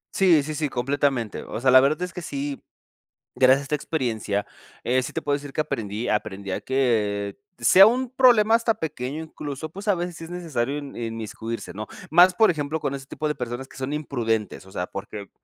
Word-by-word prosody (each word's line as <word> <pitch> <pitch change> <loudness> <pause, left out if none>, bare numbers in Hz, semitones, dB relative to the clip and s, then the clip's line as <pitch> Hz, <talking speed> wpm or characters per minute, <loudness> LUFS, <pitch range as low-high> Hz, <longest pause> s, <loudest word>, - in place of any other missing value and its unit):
Sí, 175 -6 +5
sí, 155 +2 -4
sí, 150 -1 -1
completamente. 130 -3 -1
O - - -6
sea, 130 +2 +3
la 130 0 +9
verdad 155 +6 +1
es 180 -1 -5
que 180 - -6
sí 140 -3 -4 0.7
gracias 130 +1 +5
a - - -7
esta 145 +2 -1
experiencia, 115 -9 -2 0.4
eh, 130 +2 +2
sí - - -5
te - - -3
puedo 145 - 0
decir 145 0 -7
que - - -5
aprendí 115 -6 -2
aprendí 100 -2 -2
a 100 - -2
que 105 -6 0 0.2
sea 190 +1 +8
un 250 +2 0
problema 240 -4 +5
hasta 230 -1 +3
pequeño, 150 0 -4
incluso, 150 -1 -6
pues, 195 +6 -9
a 205 - +4
veces 175 0 -4
sí 165 - -9
es - - -11
necesario 150 -7 -2
in 145 -2 -8
inmiscuirse, 115 0 -5
¿no? 110 +1 -6 0.2
Más, 175 +3 +7
por 220 +1 +5
ejemplo, 155 0 -3
con 140 - -2
ese 135 -1 -7
tipo 155 - -3
de 150 - 0
personas 125 +2 -5
que - - -17
son 130 +1 -4
imprudentes, 115 -10 -2
o - - -14
sea, 90 - -3
porque, 100 0 -7
140 Hz, 210 wpm, -24 LUFS, 115-160 Hz, 0.7 s, la